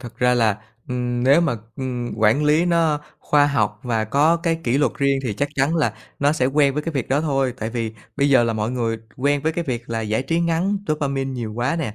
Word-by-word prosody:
thực 120 - -10
ra 125 0 +3
là, 110 -3 +2 0.3
ừm, 125 -1 -2
nếu 140 +5 +6
mà, 140 -9 0 0.2
ừm, 125 -3 -4
quản 115 +7 +3
lý 155 +3 +3
nó 165 -4 +2 0.2
khoa 145 -1 +3
học 105 -6 0
và 115 -3 -1
có 145 +9 +3
cái 165 -1 -1
kỷ 125 +3 +2
luật 145 -4 +2
riêng 140 -1 +2
thì 120 -5 -2
chắc 145 +6 -1
chắn 140 +4 +1
là 155 - +1 0.2
nó 145 +1 +3
sẽ 130 -5 +1
quen 140 0 +2
với 150 - -1
cái 165 - -4
việc 130 - -2
đó 140 +3 +2
thôi, 135 -5 0
tại 110 +1 -3
vì 115 -2 -3 0.2
bây 140 - +2
giờ 125 -3 +5
là 115 - 0
mọi 110 +1 -2
người 115 -3 -1 0.2
quen 145 +2 +1
với 160 - 0
cái 170 +1 -3
việc 120 -4 -4
là 115 -1 -1
giải 110 +3 -1
trí 165 +5 0
ngắn 170 +4 0
dopamine 140 -3 -1
nhiều 120 -4 -4
quá 120 +8 -1
nè, 130 -11 -3
135 Hz, 245 wpm, -21 LUFS, 120-150 Hz, 0.3 s, nếu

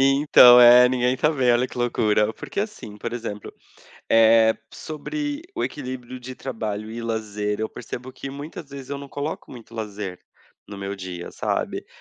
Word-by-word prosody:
Então, 135 -3 +7
é, 125 +1 +9
ninguém 125 0 +1
tá 150 +4 +2
bem. 130 -5 +2
Olha 120 +1 +3
que - - -13
loucura. 110 -3 +1
Porque 200 - -5
assim, 205 - -6
por - - -5
exemplo, 110 -4 -6 0.6
eh, 115 0 +6 0.2
sobre 290 - -5
o - - 0
equilíbrio 130 -2 -6
de 130 +1 -8
trabalho 110 -5 -5
e 115 +1 -6
lazer, 105 -2 -3
eu 110 - -3
percebo 125 +2 -8
que 135 - -7
muitas 145 +2 -8
vezes 140 -1 -10
eu 140 - -3
não 140 0 -9
coloco 145 +3 -5
muito 115 -2 -12
lazer 105 -4 -6 0.5
no 100 - -8
meu 100 0 -4
dia, 90 -2 -7
sabe? - - -2
120 Hz, 170 wpm, -23 LUFS, 110-135 Hz, 0.6 s, é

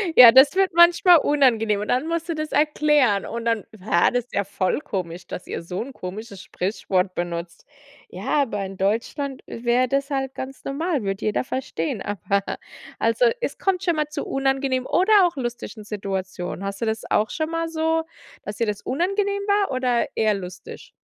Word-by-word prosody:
Ja, 245 -2 +11
das 265 +6 +6
wird 385 -2 +2
manchmal 345 +1 +7
unangenehm. 230 -9 +2
Und 210 - -5
dann 255 +5 +1
musst 335 +1 -2
du 335 - -1
das 310 0 -4
erklären. 295 -8 +3
Und 235 0 -5
dann: 230 -2 0
„Bah, 180 -3 +2
das 245 -2 -1
ist - - -27
ja 200 - 0
voll 190 +2 -1
komisch, 180 - -5
dass - - -7
ihr - - -4
so 180 +2 -4
'n 260 +4 -6
komisches 200 0 -8
Sprichwort 185 -1 -2
benutzt.“ 170 0 -5 0.4
Ja, 205 +10 0
aber 210 -6 -3
in 190 0 -8
Deutschland 235 +8 -2
i 235 - -8
wäre 245 +2 +3
das 275 +2 0
halt 270 -1 -2
ganz 265 +1 -7
normal, 290 - -2
würde 195 0 -3
jeder 215 - 0
verstehen. 255 -11 -3
Aber 200 0 -1 0.6
also, - - +2 0.2
es - - -3
kommt 385 -1 0
schon 345 -4 +1
mal 300 -1 0
zu 300 - -5
unangenehmen 270 -1 0
oder 390 +1 +5
auch 350 - -1
lustigen 240 -4 -5
Situationen. 190 -3 -5
Hast 195 0 -4
du - - +1
das 220 0 -2
auch 215 0 +2
schon 315 0 -2
mal 330 0 -1
so, 320 0 0 0.4
dass 205 - -6
dir 230 - 0
das 205 -1 -3
unangenehm 395 +7 -1
war 405 -3 +2
oder 255 -2 +1
eher 215 -1 +2
lustig? 180 -1 -9
250 Hz, 190 wpm, -23 LUFS, 200-305 Hz, 0.6 s, Ja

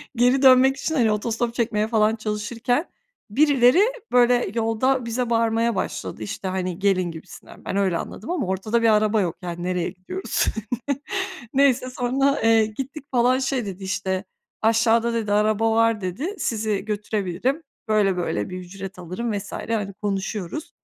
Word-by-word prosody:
geri 250 +3 +3
dönmek 265 0 +6
için, 320 - -2
hani, 235 -6 +3
otostop 230 +2 -1
çekmeye 220 -3 0
falan 220 -1 +2
çalışırken 225 - -1 0.4
birileri, 275 - +5 0.3
böyle, 245 -3 +4
yolda 235 +3 +1
bize 235 +1 -2
bağırmaya 230 0 +1
başladı, 110 - -4
işte, 110 - -5
hani, 185 -1 -3
"Gelin." 185 -3 +1
gibisinden. 160 -1 -12
Ben - - -3
öyle 190 -4 +2
anladım 225 - -6
ama 320 - -1
ortada 205 +5 0
bir 230 - +4
araba 215 0 +3
yok, 175 -4 -1
yani, 175 -1 -5
nereye 180 -1 -1
gidiyoruz? 185 - -2 1.1
Neyse 265 -2 +3
sonra, 265 +3 +1
eee, 225 -1 +5
gittik 270 +7 -6
falan 250 +1 +3
şey 260 -3 -1
dedi, 195 -1 -7
işte, 190 -1 -2 0.4
"Aşağıda." 225 +1 +3
dedi, 220 -3 -1
"Araba 215 +2 +2
var." 225 -1 +2
dedi, 235 - -3
"Sizi 215 -3 -1
götürebilirim, 210 - -2 0.2
böyle 205 -4 +2
böyle 140 -12 -2
bir 185 - -5
ücret 185 +1 -9
alırım." 185 +7 -4
vs. 200 0 -5
hani, 210 -3 -3
konuşuyoruz. 200 - -4
220 Hz, 150 wpm, -23 LUFS, 195-245 Hz, 1.1 s, dönmek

